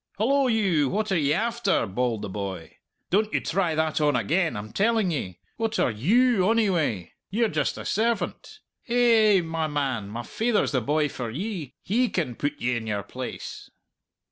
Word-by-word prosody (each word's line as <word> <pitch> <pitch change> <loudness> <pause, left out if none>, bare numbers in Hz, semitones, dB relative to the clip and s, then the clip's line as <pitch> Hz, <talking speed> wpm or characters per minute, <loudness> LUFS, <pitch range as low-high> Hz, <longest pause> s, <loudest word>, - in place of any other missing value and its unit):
"Hallo 270 +6 +2
you! 190 - +2
what 215 +4 -1
are 190 - +3
ye 145 -1 +1
after?" 225 - +1
bawled 115 +2 -1
the - - -4
boy. 95 -4 -6 0.3
"Don't 210 +3 +2
you - - +1
try 175 -2 0
that 160 0 0
on 150 -1 +3
again, 165 - +1
I'm 105 +1 -7
telling 215 -2 +2
ye. 95 - -4 0.2
What 225 -1 -1
are - - +2
you, 210 - +3
onyway? 175 - +1 0.2
Ye're 225 +4 +1
just - - -1
a - - -7
servant. 235 - -2 0.2
Hay 230 -3 +4
ay - - +6
ay, - - +2
my 165 -1 -2
man, 135 -8 -2
my 115 +3 -5
faither's 225 - 0
the 130 -4 +1
boy 150 +5 +1
for 125 -4 -5
ye. 160 - -5
He 240 +5 +1
can 155 -9 -2
put 145 +4 -3
ye 125 +1 0
in 110 -1 -4
your 105 -2 -2
place." 125 +5 -7
165 Hz, 185 wpm, -25 LUFS, -, 0.3 s, ay